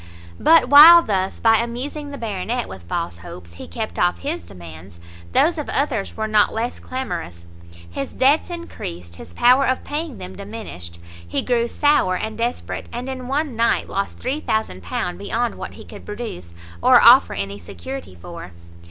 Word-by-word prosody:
But 330 0 +5
while 330 +4 +10
thus, 190 -2 -2
by 225 -1 +4
amusing 260 +6 -4
the 285 - -7
Baronet 225 +2 -3
with 95 - -10
false 85 0 -3
hopes, 85 0 -11
he 85 - -10
kept 220 -2 -5
off 175 0 +2
his 315 +5 -4
demands, 85 0 -12 0.3
those 325 - +3
of 300 - -5
others 265 -8 -1
were 220 0 -2
not 215 -1 +3
less 230 +2 -3
clamorous; 90 - -6 0.4
his 85 +11 -5
debts 280 +7 +2
increased, 90 - -8
his 85 - -11
power 255 +3 +5
of 255 0 0
paying 300 -3 -4
them 185 +1 -9
diminished; 200 - -9 0.3
he 85 - -2
grew 240 -2 +1
sour 290 -9 +2
and 220 +3 -4
desperate, 235 +2 -4
and 245 +2 -5
in 255 -1 -6
one 280 -1 -1
night 230 +1 +1
lost 195 0 -3
£3000 220 - -3
beyond 230 +4 -2
what - - -8
he - - -12
could - - -12
produce, 205 - -7 0.3
or - - +7
offer - - +6
any 100 +1 -4
security 95 +3 -9
for. 90 0 -10
220 Hz, 165 wpm, -21 LUFS, -, 0.4 s, while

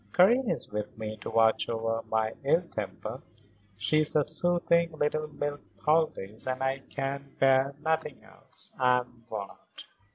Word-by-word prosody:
Karen 235 +6 +5
is - - -2
with 105 0 -4
me 110 -1 -4
to 105 - -7
watch 110 0 +3
over 115 0 -1
my 110 0 +1
ill 165 +6 +3
temper. 125 -7 -6 0.6
She 130 +9 +2
is 155 0 +1
a 150 - +5
soothing 170 +2 +2
little 155 0 0
milk 145 -1 -4 0.2
poultice 150 -10 0
and 130 0 -1
I 135 +1 0
can 140 0 -4
bear 135 +1 +4
nothing 160 -3 -1
else. - - -14
I 125 -1 +4
am 120 -1 -17
worn 100 -3 -4
out." - - -14
135 Hz, 160 wpm, -29 LUFS, 115-155 Hz, 0.6 s, Karen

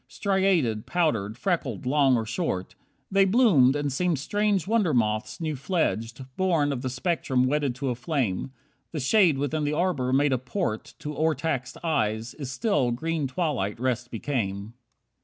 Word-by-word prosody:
Striated, 190 - +1
powdered, 115 - 0
freckled, 155 - -2
long 135 -1 +3
or 115 - -2
short. 95 -4 -3 0.4
They 195 0 +5
bloomed, 190 - +5
and 145 -2 -1
seemed 175 +2 +1
strange 205 +5 0
wonder 200 - +2
moths 110 +5 0
new 155 -3 -2
fledged, 130 - -2
Born 165 -6 +2
of 125 - -4
the 130 - -2
spectrum 130 -2 0
wedded 140 -2 0
to 135 +1 -2
a - - +1
flame. 125 - -2 0.4
The 155 - -2
shade 165 - +4
within 145 +2 -1
the 145 +1 0
arbour 150 -7 0
made 140 +1 +3
a 130 - +1
port 125 - -3
To 150 0 -5
o'ertaxed 150 -4 -1
eyes, 110 -8 -1
its 140 -4 -5
still, 135 - +1
green 155 +4 -1
twilight 130 - -2
rest 120 -1 -1
became. 110 -4 -3
140 Hz, 160 wpm, -26 LUFS, 125-165 Hz, 0.4 s, They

